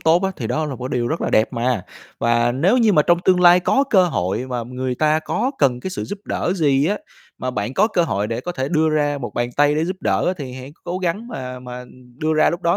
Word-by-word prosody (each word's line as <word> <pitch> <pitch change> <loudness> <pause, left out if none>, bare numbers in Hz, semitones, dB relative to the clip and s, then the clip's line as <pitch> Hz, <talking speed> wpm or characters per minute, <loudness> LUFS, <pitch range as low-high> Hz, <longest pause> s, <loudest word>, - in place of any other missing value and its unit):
tốt 165 +3 +3
á 190 - +1
thì - - -4
đó 155 0 -1
là 140 - -4
một 125 0 -5
cái - - -1
điều 120 - 0
rất 160 - -2
là - - -1
đẹp 110 - +2
mà. 120 -4 -1 0.3
Và 120 0 +2
nếu 175 - +2
như 220 -3 +4
mà 150 - +5
trong 170 +2 +3
tương 185 -1 +4
lai 175 0 +7
có 270 +9 +2
cơ 190 -3 +5
hội 120 - -1
mà 125 -2 -2
người 125 +2 -4
ta 155 +3 +2
có 200 +10 -1
cần 125 -3 +2
cái 185 - -5
sự 185 - -4
giúp 205 - -6
đỡ - - -1
gì 145 -3 +2
á, 205 +4 0 0.4
mà 130 - -2
bạn 120 +2 -3
có 210 - +4
cơ 180 -5 +1
hội 105 -10 -1
để 115 +2 -3
có 175 +7 -5
thể 135 -4 -3
đưa 160 0 +2
ra 145 -1 +1
một 120 - -6
bàn 120 0 -1
tay 145 0 +4
để 155 +2 +1
giúp 185 +2 -3
đỡ - - +1
á 180 - +2
thì 135 -4 -6
hãy 130 +2 -9
c - - -19
cố 180 +1 -3
gắng 190 +6 -2
mà 125 - -6
mà 125 0 -8 0.3
đưa 155 +2 0
ra 155 - +4
lúc 170 +1 -5
đó. 170 0 +2
150 Hz, 285 wpm, -20 LUFS, 125-175 Hz, 0.4 s, lai